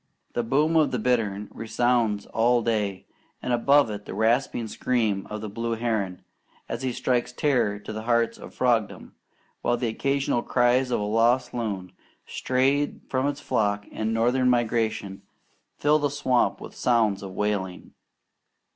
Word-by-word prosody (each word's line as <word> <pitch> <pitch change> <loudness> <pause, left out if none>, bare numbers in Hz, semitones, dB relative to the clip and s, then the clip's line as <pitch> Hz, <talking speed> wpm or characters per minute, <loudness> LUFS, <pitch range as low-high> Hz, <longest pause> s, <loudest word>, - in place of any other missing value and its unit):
The 120 - 0
boom 145 +7 +1
of 155 -3 +4
the 130 - -1
bittern 105 -4 0
resounds 115 -2 0
all 120 +1 +2
day, 105 -5 -1 0.3
and 125 - -2
above 140 +1 +4
it 105 0 -6
the - - -7
rasping 115 +2 +1
scream 110 -4 -1
of 105 0 -5
the 110 - -4
blue 115 +3 -3
heron, 110 -6 -2 0.4
as - - -4
he 130 -1 -1
strikes 125 0 0
terror 125 -6 +1
to 105 +1 -8
the 110 - -4
hearts 115 0 +1
of - - -10
frogdom; 120 -5 0 0.5
while 120 - +1
the 120 -1 -1
occasional 135 +1 0
cries 125 +1 +2
of 125 - 0
a - - -2
lost 120 +4 +2
loon, 100 -6 -3 0.3
strayed 135 +3 0
from 130 +1 0
its 145 0 -3
flock 105 -1 0
in 110 0 -2
northern 125 +3 +2
migration, 110 -5 0 0.6
fill 150 +1 +3
the 145 -1 +1
swamp 130 -3 +1
with - - -9
sounds 110 -5 +1
of 95 -1 -7
wailing. 100 -3 -2
115 Hz, 155 wpm, -25 LUFS, 105-125 Hz, 0.6 s, of